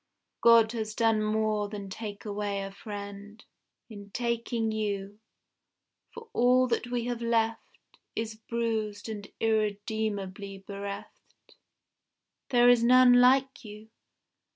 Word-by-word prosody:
God 230 Hz, -1 st, +6 dB
has 220 Hz, -2 st, -4 dB
done 225 Hz, -2 st, +2 dB
more 215 Hz, -1 st, 0 dB
than 200 Hz, -1 st, -7 dB
take 205 Hz, +1 st, -7 dB
away 205 Hz, -1 st, -3 dB
a 195 Hz, -, -6 dB
friend 205 Hz, +1 st, -9 dB, 0.4 s
In 205 Hz, -3 st, -11 dB
taking 235 Hz, 0 st, -2 dB
you; 205 Hz, -1 st, -3 dB, 0.9 s
for 460 Hz, -1 st, -11 dB
all 250 Hz, +2 st, +4 dB
that 235 Hz, 0 st, -1 dB
we 245 Hz, -1 st, -2 dB
have 240 Hz, 0 st, -3 dB
left 230 Hz, -1 st, -2 dB, 0.2 s
Is 225 Hz, 0 st, -3 dB
bruised 220 Hz, -2 st, -3 dB
and 210 Hz, -2 st, -7 dB
irremediably 205 Hz, -2 st, -2 dB
bereft. 200 Hz, 0 st, -9 dB, 0.9 s
There 245 Hz, -2 st, +5 dB
is 245 Hz, -1 st, +6 dB
none 250 Hz, +1 st, +7 dB
like 265 Hz, +1 st, +3 dB
you. 215 Hz, 0 st, -11 dB
220 Hz, 115 wpm, -28 LUFS, 205-235 Hz, 0.9 s, none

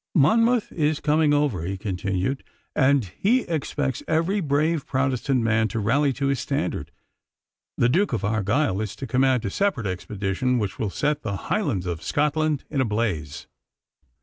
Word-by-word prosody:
'Monmouth 230 Hz, -, +3 dB
is 155 Hz, -2 st, 0 dB
coming 150 Hz, 0 st, +2 dB
over,' 145 Hz, -, +1 dB
he 95 Hz, +3 st, -3 dB
continued, 100 Hz, +5 st, -2 dB, 0.3 s
'and 130 Hz, -8 st, +3 dB
he 245 Hz, +6 st, +3 dB
expects 145 Hz, -, -2 dB
every 165 Hz, +6 st, +1 dB
brave 155 Hz, -1 st, 0 dB
Protestant 130 Hz, -1 st, 0 dB
man 115 Hz, -1 st, +2 dB
to 115 Hz, -, -3 dB
rally 135 Hz, +7 st, +2 dB
to 140 Hz, +3 st, -2 dB
his 135 Hz, -2 st, +1 dB
standard. 140 Hz, -11 st, -2 dB, 0.9 s
The 120 Hz, -, +4 dB
Duke 185 Hz, +11 st, +2 dB
of 110 Hz, -6 st, -1 dB
Argyle 110 Hz, +2 st, +1 dB
is 105 Hz, -3 st, -4 dB
to 135 Hz, -, -6 dB
command 130 Hz, -1 st, +2 dB
a 100 Hz, -, -2 dB
separate 185 Hz, -, 0 dB
expedition, 100 Hz, +6 st, -1 dB
which 105 Hz, -4 st, -3 dB
will 110 Hz, -, -1 dB
set 150 Hz, +8 st, -1 dB
the 100 Hz, -3 st, -3 dB
Highlands 125 Hz, -, -1 dB
of 85 Hz, -2 st, -3 dB
Scotland 150 Hz, 0 st, 0 dB
in 140 Hz, -3 st, +1 dB
a -, -, +2 dB
blaze. 105 Hz, -10 st, -2 dB
130 Hz, 160 wpm, -24 LUFS, 105-150 Hz, 0.9 s, The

